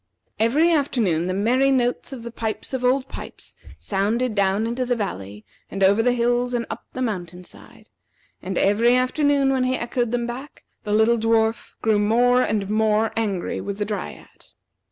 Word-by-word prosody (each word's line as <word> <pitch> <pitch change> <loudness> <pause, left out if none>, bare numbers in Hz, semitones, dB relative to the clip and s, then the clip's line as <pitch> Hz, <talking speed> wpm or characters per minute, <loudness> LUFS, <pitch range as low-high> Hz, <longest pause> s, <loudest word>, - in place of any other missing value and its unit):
Every 290 +10 +3
afternoon 225 - +1
the 185 - -1
merry 250 +7 +2
notes 250 -1 0
of 255 -4 -7
the 235 - -7
pipes 220 +2 -5
of 260 -1 -2
Old 255 +1 +2
Pipes - - -10 0.2
sounded 220 +5 -1
down 200 +1 +1
into 240 +3 -2
the 245 0 0
valley 105 - -5 0.2
and 195 - -2
over 200 +3 +5
the 245 +1 +2
hills 245 +1 0
and 235 -1 -1
up - - -7
the 255 - -3
mountain 180 -6 -4
side; - - -16 0.5
and 190 0 -4
every 230 +5 +3
afternoon 275 +2 +2
when 260 -1 +1
he 255 0 +1
had - - -3
echoed 240 0 -1
them 240 0 -1
back, 255 +4 -8 0.2
the 210 - -3
little 220 +2 +3
dwarf 225 0 0
grew 220 -2 +3
more 245 +4 +3
and 210 -4 -1
more 215 +1 +1
angry 205 -5 -2
with 200 -1 -5
the 205 - -2
Dryad. 210 -1 -7
230 Hz, 180 wpm, -22 LUFS, 205-250 Hz, 0.5 s, over